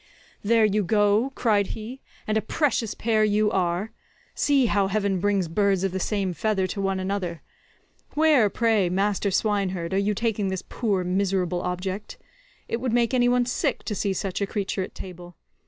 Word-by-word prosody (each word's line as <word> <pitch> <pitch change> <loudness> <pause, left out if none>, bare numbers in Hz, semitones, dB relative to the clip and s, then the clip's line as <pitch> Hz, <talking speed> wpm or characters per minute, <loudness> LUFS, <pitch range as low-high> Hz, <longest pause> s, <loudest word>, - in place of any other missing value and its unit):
"There 225 +1 +4
you 210 0 +1
go," 205 +5 +2
cried 205 -4 +2
he, 235 +5 -8 0.2
"and 215 - -1
a 220 - +2
precious 235 -1 0
pair 220 -1 +1
you 210 0 +2
are. 180 +3 -1 0.4
See 280 -3 +2
how 200 -3 +2
heaven 200 -1 0
brings 200 -2 +1
birds 195 +2 +1
of 195 - 0
the 190 - -3
same 195 -1 -1
feather 200 0 0
to 200 +2 -4
one 195 -1 0
another. 185 -4 -3 0.7
Where, 295 -8 +4
pray, 220 -4 +2
master 200 +2 0
swineherd, 190 -4 0
are 195 - +2
you 205 +1 0
taking 220 -2 -1
this 190 -1 -3
poor 205 -6 -1
miserable 180 -1 0
object? 185 +3 -4 0.5
It - - -1
would 250 -3 -1
make 240 +1 +2
any 245 -1 +3
one 245 0 +2
sick 245 - -1
to 215 - -3
see 200 0 -1
such 190 +1 -3
a 200 - 0
creature 195 -1 -2
at 185 - -6
table. 175 -2 -9
200 Hz, 180 wpm, -25 LUFS, 190-220 Hz, 0.7 s, There